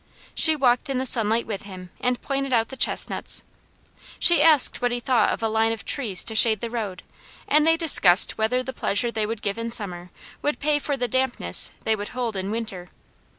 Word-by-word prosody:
She 315 -1 +6
walked 250 -2 +1
in 270 - -2
the 260 - -2
sunlight 225 -1 +1
with 205 -3 -6
him 185 -3 -11
and 250 0 -2
pointed 275 -1 -3
out 225 -2 0
the 265 - -8
chestnuts. - - -1 0.7
She 345 -1 +6
asked 305 -7 +3
what 245 0 0
he 245 - -3
thought 245 0 +1
of - - -5
a - - +1
line 220 +1 0
of 225 -2 -7
trees 220 -10 +1
to 225 - -2
shade 220 -1 +4
the 230 +1 -6
road, 210 -6 -6 0.4
and 300 +1 +2
they 325 0 +3
discussed 205 - +5
whether 250 +4 -1
the 265 - -7
pleasure 235 +1 -1
they 215 -2 -3
would 225 0 -6
give 200 +2 -3
in 230 0 -4
summer 180 -6 -1 0.3
would 295 - -2
pay 295 0 0
for 285 -1 -3
the 245 -1 -2
dampness 245 - -1
they 220 - 0
would 205 -1 -7
hold 235 -4 -3
in 190 0 -4
winter. 205 -5 -6
230 Hz, 210 wpm, -23 LUFS, 210-265 Hz, 0.7 s, She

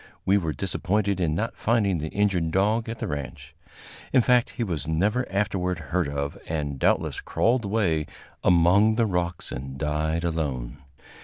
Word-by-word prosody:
We 100 +2 +4
were 80 -4 -2
disappointed 95 +5 -1
in 80 -4 +1
not 115 +6 -2
finding 105 -6 +1
the 75 - -3
injured 95 -3 +1
dog 105 +6 +1
at 115 - -4
the - - -4
ranch. 70 -3 -6 0.6
In 130 -3 +5
fact, 125 0 +3
he 120 - -4
was 85 -8 -2
never 105 +10 0
afterward 95 -3 0
heard 85 0 -1
of, 70 0 -3
and 75 -4 -3
doubtless - - +1
crawled 115 -1 +1
away 95 -7 0 0.4
among 95 +5 +5
the 115 0 +2
rocks 90 -3 -2
and 65 +2 -6
died 75 +3 -1
alone. 70 -7 -2
90 Hz, 160 wpm, -25 LUFS, 80-105 Hz, 0.6 s, In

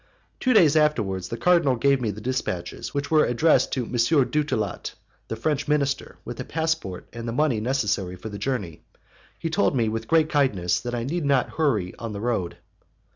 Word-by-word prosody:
"Two 255 - +1
days 165 - +5
afterwards, 105 - +1
the 115 - -4
cardinal 170 -6 +3
gave 135 +2 +2
me 115 - 0
the 105 +1 -5
dispatches, 105 -8 -3
which 145 +1 -3
were 155 -1 +5
addressed 130 +2 +3
to 125 -3 -1
M. - - -10
Dutillot, 125 - 0 0.3
the - - -3
French 150 -2 -1
minister, 140 -2 0
with - - -7
a - - -2
passport 160 - -2
and 115 0 -6
the - - -2
money 130 -2 +1
necessary 105 -7 -1
for 110 +5 -8
the 105 -1 -7
journey. 105 -12 -3 0.6
He 165 - -4
told 160 -3 +2
me, 115 -3 +2
with 115 +1 -4
great 160 -1 +4
kindness, 95 - +1
that 120 0 -4
I 120 - -2
need 165 +6 -2
not 140 -3 +2
hurry 115 - 0
on 115 -2 -5
the 100 - -5
road. 110 -6 -2
125 Hz, 190 wpm, -24 LUFS, 110-150 Hz, 0.6 s, days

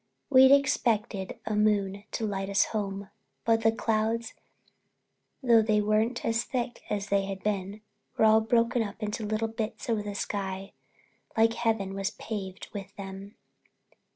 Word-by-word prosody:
We'd 265 0 +8
expected 235 -6 +2
a 215 - -1
moon 205 -1 +1
to 225 - -1
light 195 -2 -2
us 200 - +3
home, 200 -2 -3 0.3
but 225 0 +3
the 225 0 +4
clouds, 225 +1 -1 1.1
though 235 -3 +6
they 215 -1 +2
weren't 215 +3 +1
as 230 +1 +1
thick 245 -1 -3
as 205 -1 -2
they 200 -1 +2
had 195 -1 -6
been, 205 0 -2 0.4
were 220 - +5
all 220 0 +6
broken 230 +1 +2
up 215 0 -5
into 215 +1 -3
little 215 +1 0
bits 225 +1 -4
over 220 -2 +1
the 205 -1 -5
sky, 195 -1 -4 0.6
like 225 +1 +4
Heaven 220 -5 0
was 195 0 -1
paved 195 -4 -6
with 200 -1 -7
them. 195 +1 -8
215 Hz, 155 wpm, -28 LUFS, 200-225 Hz, 1.1 s, We'd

